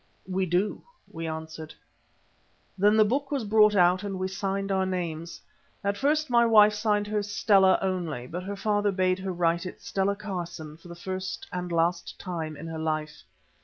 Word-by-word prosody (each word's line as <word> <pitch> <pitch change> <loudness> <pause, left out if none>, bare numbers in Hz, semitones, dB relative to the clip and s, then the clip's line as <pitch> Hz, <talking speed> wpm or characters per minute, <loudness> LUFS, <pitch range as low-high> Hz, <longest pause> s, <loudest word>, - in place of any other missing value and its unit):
"We 190 0 -1
do," 180 +5 0 0.3
we 165 0 -5
answered. 160 0 -7 1.0
Then 205 +3 +4
the 215 - +6
book 275 +6 -1
was 280 -5 -1
brought 210 0 +5
out 180 0 +4
and 200 -2 -4
we 185 0 -2
signed 195 +1 -2
our 190 -1 +2
names. 170 -3 -4 0.4
At 200 0 0
first 305 +6 +1
my 240 -2 +4
wife 215 -2 +6
signed 210 0 +1
hers 210 -1 -2
"Stella" 195 -2 +4
only, 175 -9 -2
but 175 +7 -5
her 200 +2 -5
father 205 0 +1
bade 185 -1 +1
her 190 0 -3
write 170 0 0
it - - -9
Stella 195 +1 -1
Carson 175 -7 -6
for 165 +2 -16
the 170 - -9
first 185 0 -5
and 180 -1 -3
last 170 +1 0
time 160 -5 -5
in 155 - -8
her 165 -1 -5
life. 155 -1 -3
185 Hz, 180 wpm, -27 LUFS, 170-205 Hz, 1.0 s, the